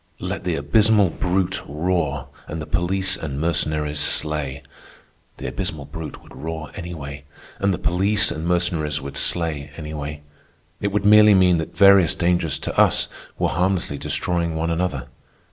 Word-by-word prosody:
Let -, -, -5 dB
the -, -, 0 dB
abysmal 100 Hz, +6 st, +3 dB
brute 95 Hz, +1 st, -1 dB
roar 75 Hz, -1 st, -2 dB, 0.2 s
and 80 Hz, -, -5 dB
the 75 Hz, -, -5 dB
police 95 Hz, +4 st, +1 dB
and 75 Hz, -8 st, -5 dB
Mercenaries 75 Hz, -2 st, -1 dB
slay. 75 Hz, -2 st, +1 dB, 0.7 s
The -, -, -8 dB
abysmal 75 Hz, -3 st, -4 dB
brute 80 Hz, +2 st, -8 dB
would -, -, -15 dB
roar 80 Hz, 0 st, -6 dB
anyway, 75 Hz, -6 st, -7 dB, 0.3 s
and 100 Hz, 0 st, +2 dB
the 90 Hz, -, -1 dB
police 100 Hz, +7 st, +2 dB
and 80 Hz, +2 st, -4 dB
Mercenaries 85 Hz, -4 st, 0 dB
would 70 Hz, -1 st, -8 dB
slay 80 Hz, -4 st, 0 dB
anyway. 75 Hz, -2 st, -6 dB, 0.6 s
It 100 Hz, -, -1 dB
would 105 Hz, +1 st, -1 dB
merely 105 Hz, 0 st, +7 dB
mean 90 Hz, -3 st, +4 dB
that 80 Hz, +1 st, -6 dB
various 100 Hz, -4 st, +6 dB
dangers 85 Hz, -5 st, +1 dB
to -, -, -4 dB
us -, -, +4 dB, 0.3 s
were -, -, +1 dB
harmlessly 90 Hz, -5 st, 0 dB
destroying 85 Hz, -2 st, -1 dB
one 80 Hz, +1 st, -1 dB
another. 85 Hz, -6 st, -2 dB
85 Hz, 150 wpm, -22 LUFS, 75-90 Hz, 0.7 s, merely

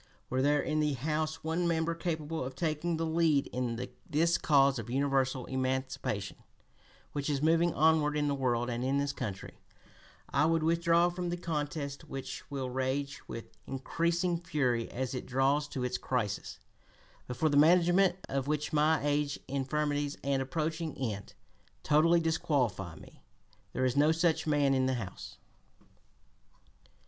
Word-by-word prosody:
Were 130 Hz, +1 st, +1 dB
there 145 Hz, +1 st, +3 dB
in 155 Hz, -, 0 dB
the 150 Hz, -1 st, +2 dB
House 155 Hz, +4 st, -2 dB
one 165 Hz, +2 st, 0 dB
member 165 Hz, 0 st, +1 dB
capable 165 Hz, -3 st, -3 dB
of 130 Hz, +1 st, -6 dB
taking 160 Hz, +2 st, -1 dB
the 165 Hz, -, -1 dB
lead 160 Hz, -3 st, +2 dB
in 120 Hz, -2 st, -2 dB, 0.3 s
this 165 Hz, +3 st, +2 dB
cause 140 Hz, -3 st, +4 dB
of 115 Hz, 0 st, -7 dB
universal 135 Hz, -1 st, +1 dB
emancipation, 130 Hz, -5 st, -2 dB, 0.7 s
which 145 Hz, 0 st, -3 dB
is 145 Hz, -1 st, 0 dB
moving 165 Hz, +2 st, +4 dB
onward 155 Hz, -1 st, +3 dB
in 145 Hz, 0 st, +1 dB
the 145 Hz, -, +1 dB
world 120 Hz, -3 st, 0 dB
and 120 Hz, 0 st, -2 dB
in 135 Hz, +2 st, +1 dB
this 140 Hz, 0 st, 0 dB
country, 100 Hz, -7 st, -6 dB, 0.7 s
I -, -, +2 dB
would 165 Hz, 0 st, +2 dB
withdraw 170 Hz, +1 st, +3 dB
from 175 Hz, 0 st, -4 dB
the 175 Hz, -, -2 dB
contest 150 Hz, -3 st, -3 dB
which 135 Hz, -3 st, -7 dB
will 135 Hz, -3 st, -3 dB
rage 135 Hz, +2 st, -2 dB
with 115 Hz, -, -8 dB
increasing 170 Hz, +6 st, 0 dB
fury 130 Hz, -8 st, 0 dB
as 130 Hz, +1 st, -3 dB
it 125 Hz, -, -5 dB
draws 135 Hz, +3 st, +2 dB
to 130 Hz, -3 st, -4 dB
its 125 Hz, 0 st, -1 dB
crisis, 110 Hz, -6 st, -2 dB, 0.7 s
but 125 Hz, -, -5 dB
for 155 Hz, -, +2 dB
the 145 Hz, -, 0 dB
management 175 Hz, +4 st, +5 dB
of 135 Hz, 0 st, -2 dB
which 150 Hz, +1 st, -1 dB
my 155 Hz, 0 st, +3 dB
age, 145 Hz, 0 st, 0 dB
infirmities, 145 Hz, +1 st, -1 dB
and 140 Hz, -1 st, +1 dB
approaching 160 Hz, +2 st, -3 dB
end 105 Hz, -6 st, -4 dB, 0.5 s
totally 165 Hz, +3 st, +4 dB
disqualify 125 Hz, -, 0 dB
me. -, -, -15 dB, 0.5 s
There 130 Hz, -, 0 dB
is 125 Hz, 0 st, +1 dB
no 150 Hz, +2 st, +5 dB
such 165 Hz, 0 st, +1 dB
man 145 Hz, -2 st, +3 dB
in 130 Hz, -1 st, +2 dB
the 130 Hz, -, +1 dB
House." 110 Hz, -6 st, -7 dB
145 Hz, 155 wpm, -31 LUFS, 130-160 Hz, 0.7 s, management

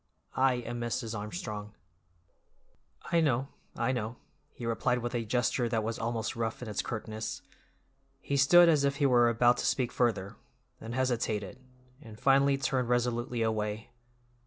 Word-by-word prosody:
"I 130 Hz, 0 st, +4 dB
am 120 Hz, 0 st, -5 dB
Mrs. 115 Hz, -1 st, -3 dB
Armstrong." 105 Hz, 0 st, -6 dB, 1.4 s
"I 170 Hz, -1 st, +4 dB
know, 135 Hz, -3 st, +1 dB, 0.3 s
I -, -, 0 dB
know," 120 Hz, -2 st, -3 dB, 0.4 s
he 120 Hz, -, -8 dB
replied 115 Hz, +2 st, 0 dB
with 120 Hz, 0 st, -4 dB
a 120 Hz, -1 st, -1 dB
gesture 125 Hz, +1 st, 0 dB
that 115 Hz, -2 st, 0 dB
was 115 Hz, +1 st, -3 dB
almost 115 Hz, -1 st, -2 dB
rough 115 Hz, -1 st, -2 dB
in -, -, -7 dB
its 105 Hz, -, -2 dB
curtness. 110 Hz, -1 st, -5 dB, 0.8 s
He 140 Hz, -, -3 dB
stood 170 Hz, +6 st, +7 dB
as 155 Hz, -4 st, +4 dB
if 140 Hz, 0 st, +1 dB
he 140 Hz, -, +1 dB
were 120 Hz, -3 st, +5 dB
about 120 Hz, +1 st, +3 dB
to -, -, -2 dB
speak 125 Hz, -2 st, 0 dB
further, 105 Hz, -4 st, -1 dB, 0.4 s
then 115 Hz, +1 st, -7 dB
hesitated, 120 Hz, -4 st, -1 dB, 0.4 s
and 110 Hz, -4 st, -12 dB
finally 140 Hz, 0 st, +4 dB
turned 135 Hz, -3 st, -1 dB
resolutely 120 Hz, -1 st, 0 dB
away. 110 Hz, 0 st, -2 dB
120 Hz, 155 wpm, -30 LUFS, 110-130 Hz, 1.4 s, stood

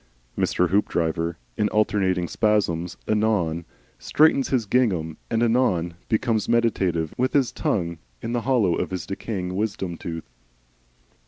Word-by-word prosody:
Mr. 90 Hz, -1 st, +1 dB
Hoopdriver 85 Hz, -4 st, 0 dB, 0.2 s
in 105 Hz, -, +2 dB
alternating 95 Hz, -4 st, +1 dB
spasms 90 Hz, -6 st, 0 dB
anon 105 Hz, -7 st, +1 dB, 0.3 s
straightens 150 Hz, -3 st, +3 dB
his 125 Hz, -5 st, +1 dB
gingham 95 Hz, -9 st, +1 dB
and 115 Hz, 0 st, +1 dB
anon 110 Hz, -8 st, +2 dB, 0.2 s
becomes 110 Hz, -1 st, +1 dB
meditative, 95 Hz, -9 st, +1 dB
with 130 Hz, +1 st, +1 dB
his 135 Hz, -4 st, +3 dB
tongue 85 Hz, -4 st, -1 dB, 0.2 s
in 115 Hz, -, -4 dB
the 120 Hz, 0 st, 0 dB
hollow 115 Hz, -9 st, +2 dB
of -, -, -1 dB
his 95 Hz, -1 st, -4 dB
decaying 95 Hz, -2 st, -4 dB
wisdom 95 Hz, -4 st, -2 dB
tooth. 80 Hz, -1 st, -6 dB
100 Hz, 130 wpm, -24 LUFS, 85-115 Hz, 0.3 s, straightens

